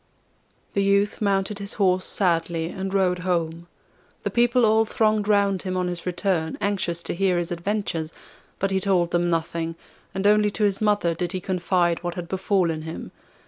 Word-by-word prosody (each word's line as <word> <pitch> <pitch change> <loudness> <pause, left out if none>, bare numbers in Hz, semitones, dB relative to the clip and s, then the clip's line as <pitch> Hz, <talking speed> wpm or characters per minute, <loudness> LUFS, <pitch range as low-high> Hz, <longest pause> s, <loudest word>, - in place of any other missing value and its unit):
The 200 - +1
youth 200 +2 +2
mounted 200 0 0
his 200 0 -3
horse 185 -2 +2
sadly, 165 -3 0
and 190 +1 -4
rode 185 -2 +2
home. 170 -2 -2 0.6
The - - -2
people 240 0 +3
all 220 +1 +4
thronged 215 -1 +1
round 200 -2 +2
him 185 -1 -3
on 180 -1 0
his 175 0 -5
return, 175 -3 -1
anxious 180 -4 -1
to - - -2
hear 185 0 +1
his 175 +1 -2
adventures, 170 -3 -2 0.5
but 195 0 -1
he 190 - +2
told 185 -3 +1
them 175 0 +1
nothing, 165 0 -2 0.4
and 195 +1 -2
only 210 0 +5
to 210 - -2
his 200 -1 +1
mother 205 -5 +2
did 175 +2 -3
he 185 - -1
confide 175 -2 0
what 175 -1 -4
had 175 -1 -5
befallen 185 -3 0
him. 160 +1 -7
185 Hz, 180 wpm, -24 LUFS, 170-200 Hz, 0.6 s, only